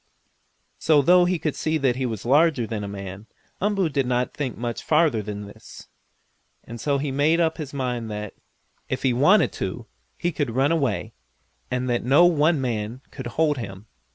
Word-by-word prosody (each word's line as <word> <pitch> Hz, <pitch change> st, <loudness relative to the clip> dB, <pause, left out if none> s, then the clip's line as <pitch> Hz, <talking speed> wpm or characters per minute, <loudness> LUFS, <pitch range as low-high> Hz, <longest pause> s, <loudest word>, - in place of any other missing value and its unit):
So, 150 Hz, -3 st, +4 dB
though 180 Hz, +3 st, +6 dB
he 180 Hz, 0 st, +1 dB
could 155 Hz, -2 st, -2 dB
see 160 Hz, 0 st, 0 dB
that 135 Hz, -5 st, +1 dB
he 130 Hz, 0 st, -1 dB
was 110 Hz, -3 st, -5 dB
larger 140 Hz, -1 st, +3 dB
than 110 Hz, -2 st, -4 dB
a -, -, -4 dB
man, 100 Hz, +1 st, -8 dB, 0.3 s
Umboo 200 Hz, -2 st, +1 dB
did 140 Hz, -3 st, 0 dB
not 125 Hz, 0 st, 0 dB
think 135 Hz, -5 st, -4 dB
much 120 Hz, 0 st, -4 dB
farther 150 Hz, -8 st, +2 dB
than 105 Hz, 0 st, -6 dB
this, 100 Hz, -, -13 dB, 0.7 s
and 115 Hz, 0 st, -9 dB
so 140 Hz, -1 st, +1 dB
he 140 Hz, 0 st, -2 dB
never 135 Hz, -, -5 dB
made 155 Hz, +4 st, +3 dB
up 160 Hz, -1 st, +1 dB
his 145 Hz, -3 st, -5 dB
mind 125 Hz, -4 st, -3 dB
that, 105 Hz, -1 st, -5 dB, 0.6 s
if 130 Hz, -, -3 dB
he 130 Hz, -2 st, +3 dB
wanted 165 Hz, -, +4 dB
to, 95 Hz, +5 st, -5 dB, 0.3 s
he 175 Hz, -, -1 dB
could 145 Hz, -7 st, -2 dB
run 135 Hz, +4 st, +3 dB
away, 125 Hz, -, -1 dB, 0.6 s
and 125 Hz, 0 st, -2 dB
that 120 Hz, -1 st, 0 dB
no 140 Hz, +8 st, +5 dB
one 160 Hz, -2 st, +3 dB
man 120 Hz, -1 st, -3 dB
could 130 Hz, -3 st, -7 dB
hold 150 Hz, +3 st, +1 dB
him. 100 Hz, -3 st, -7 dB
130 Hz, 190 wpm, -24 LUFS, 115-155 Hz, 0.7 s, though